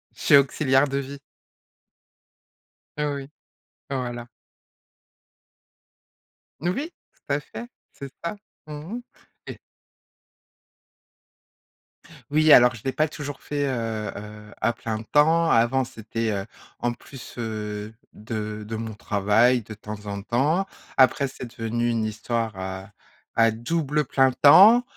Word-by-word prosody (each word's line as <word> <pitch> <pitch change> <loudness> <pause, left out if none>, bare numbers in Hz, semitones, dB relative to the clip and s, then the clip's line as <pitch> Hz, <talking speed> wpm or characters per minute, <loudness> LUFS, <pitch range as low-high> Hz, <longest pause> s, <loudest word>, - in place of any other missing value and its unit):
Je - - -13
suis - - +6
auxiliaire 135 0 +3
de 135 0 -2
vie. 140 +1 -7 1.8
Heu, 150 -1 0
oui. 135 0 -7 0.6
Voilà. 120 -3 -4 2.3
Oui, 250 - -2 0.2
tout 140 - -5
à 140 - +1
fait, 235 +10 -9 0.3
c'est 140 -1 -9
ça. 170 +5 -3 0.3
Mmh 155 - -8 0.2
mh. 245 - -5 0.5
Et - - -7 2.7
Oui, 155 +1 +4
alors 125 -3 +8
je 110 - -12
l'ai 135 - 0
pas 155 +3 +1
toujours 145 -2 -7
fait, 145 -1 -2
heu, 115 -4 -3
heu 105 0 -10
à 115 +2 +1
plein 110 -2 -4
temps. 155 +8 +3
Avant, 120 +3 +3
c'était, 110 0 -3
heu, 100 -1 -2 0.3
en 120 - 0
plus, 125 +1 -11
heu, 105 -2 -4 0.2
de 105 -1 -5
de 110 - -4
mon 110 0 -5
travail, 105 +4 +2
de 110 - -10
temps 105 0 -9
en 100 0 -4
temps. 145 - +1 0.3
Après, 135 +1 +4
c'est 130 - -8
devenu 120 +1 -1
une 115 -2 0
histoire 110 +1 -2
à 95 +1 -6 0.4
à 115 0 +5
double 150 +6 -1
plein 135 0 +3
temps 190 - +8
120 Hz, 125 wpm, -24 LUFS, 110-145 Hz, 2.7 s, alors